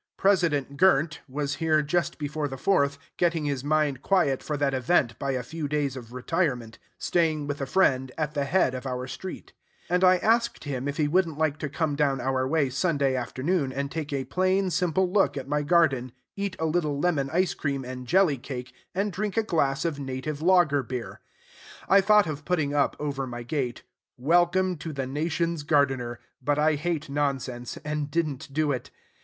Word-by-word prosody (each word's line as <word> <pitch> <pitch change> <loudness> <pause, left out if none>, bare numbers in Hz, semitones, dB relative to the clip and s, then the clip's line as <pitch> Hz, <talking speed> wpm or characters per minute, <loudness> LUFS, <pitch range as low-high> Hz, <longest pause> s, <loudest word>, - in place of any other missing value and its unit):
President 165 -8 +2
Gr 185 -5 +6
nt 155 -2 -9
was 145 +1 -2
here 155 -2 +2
just 170 +4 0
before 150 0 -2
the 135 -1 -6
Fourth, 140 -3 +2 0.2
getting 170 -3 +1
his 140 -3 -2
mind 145 -3 +1
quiet 175 -9 +2
for 150 - -3
that 140 -1 +1
event 130 -2 +2
by 140 - -2
a 125 -1 -2
few 160 +3 -4
days 145 -2 -1
of 120 -3 -9
retirement, 125 -3 -2 0.2
staying 160 -4 +1
with 145 0 -4
a 135 - -2
friend 130 -6 +2
at 150 -2 -2
the 145 -2 0
head 140 -3 +2
of 130 +1 -5
our 125 0 -3
street; 135 +9 -8 0.4
and 180 +1 +2
I 185 0 +6
asked 235 +4 +1
him 140 -2 -3
if 145 - -3
he 150 - +2
wouldn't 165 -1 +1
like 155 -1 0
to 150 - -3
come 155 0 -1
down 140 -2 +1
our 130 +1 0
way 145 -2 +1
Sunday 140 -2 +1
afternoon 130 +4 -1
and 140 +1 -3
take 155 -3 -4
a 135 -2 -2
plain, 185 +1 +1
simple 180 +1 +1
look 195 -4 +2
at 135 -1 -5
my 150 +1 0
garden, 145 -6 +2 0.2
eat 200 -1 -3
a 160 - -1
little 155 -3 0
lemon 145 -5 +1
ice 180 +2 +2
cream 140 -3 -3
and 125 0 -7
jelly 175 -4 +3
cake, 130 -1 -7 0.2
and 200 +1 0
drink 205 +1 -3
a 225 - +3
glass 140 -7 0
of 155 -4 -1
native 140 +2 -4
lager 170 -5 +4
beer. 125 -1 -6 0.7
I 195 +1 +6
thought 210 0 +5
of 150 -2 -5
putting 155 -4 0
up 145 -1 +2
over 140 -3 -3
my 120 -1 -6
gate, 125 -1 -3 0.3
"Welcome 175 +6 +2
to 155 +1 -6
the 135 -2 -3
Nation's 160 +4 -1
Gardener;" 135 -5 +1 0.2
but 145 +2 +1
I 155 +1 +3
hate 155 0 -2
nonsense, 135 -4 -2
and 150 -1 -2
did 165 +2 +1
n't 140 0 -7
do 150 +1 +1
it. 130 - -3
145 Hz, 195 wpm, -26 LUFS, 135-170 Hz, 0.7 s, Gr